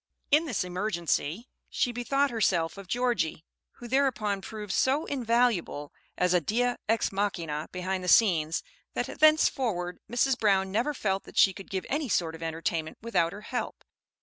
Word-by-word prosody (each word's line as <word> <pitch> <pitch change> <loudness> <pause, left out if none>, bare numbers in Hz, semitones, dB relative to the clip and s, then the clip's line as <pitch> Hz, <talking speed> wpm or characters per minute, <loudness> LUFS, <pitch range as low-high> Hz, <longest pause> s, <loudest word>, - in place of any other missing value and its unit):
In 305 +3 +5
this 240 -11 -1
emergency 180 - -2 0.2
she 245 - 0
bethought 275 +3 0
herself 180 -8 +1
of 195 -2 -10
Georgie, 235 -9 -1 0.3
who 240 - -10
thereupon 235 -6 +1
proved 210 -1 -6
so 275 +5 +2
"invaluable" 235 - 0 0.2
as 180 0 +2
a 180 - +4
dea 245 +8 +1 0.2
ex 225 -1 +2
machina 170 -7 -2
behind 185 +1 -3
the - - -5
scenes, 165 -6 +4 0.3
that - - -3
thenceforward 250 - +3
Mrs. 250 +2 +2
Brown 195 -3 +2
never 240 +9 0
felt 195 -5 -1
that - - -13
she 195 - +6
could 195 - -11
give 190 -1 -3
any 290 -1 -1
sort 165 -4 +1
of 165 - -10
entertainment 165 0 -3
without 170 -8 +1
her 205 - -9
help. 245 +3 -4
200 Hz, 160 wpm, -28 LUFS, 175-245 Hz, 0.3 s, she